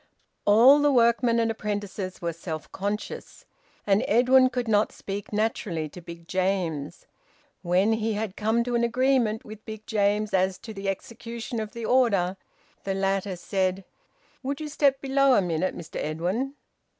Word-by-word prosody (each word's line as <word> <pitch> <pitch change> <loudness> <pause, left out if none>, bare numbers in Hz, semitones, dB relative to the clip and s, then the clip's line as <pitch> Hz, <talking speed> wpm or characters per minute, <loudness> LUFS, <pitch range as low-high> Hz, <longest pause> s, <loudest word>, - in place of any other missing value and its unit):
All 240 +8 +7
the 290 0 +4
workmen 235 -1 +3
and 230 -1 +1
apprentices 205 -4 -4
were 170 -1 -1
self 160 -2 -7
conscious. 205 +2 -5 0.4
And 200 0 +3
Edwin 255 +3 +5
could 245 -1 -3
not 210 -1 +2
speak 200 0 -6
naturally 205 -7 -1
to 180 - -11
Big 170 0 -11
James. 180 -6 -2 0.6
When 185 +5 +2
he 220 0 -1
had 210 -2 -3
come 220 +2 +1
to 245 0 -3
an 235 0 +2
agreement 240 -2 +1
with 215 0 -10
Big 220 -1 -8
James 210 -1 +1
as 190 0 +2
to 220 - -9
the 195 -1 -3
execution 230 +2 -5
of 215 -1 -5
the 235 -1 -5
order, 205 -8 +2 0.5
the 195 -1 -2
latter 195 0 0
said 185 +1 -1 0.6
"Would 275 +2 -3
you 305 -1 -5
step 280 -2 +2
below 275 -1 +3
a - - +4
minute, 175 +1 -1
Mr 165 -2 -8
Edwin?" 185 - -2
210 Hz, 160 wpm, -26 LUFS, 190-235 Hz, 0.6 s, All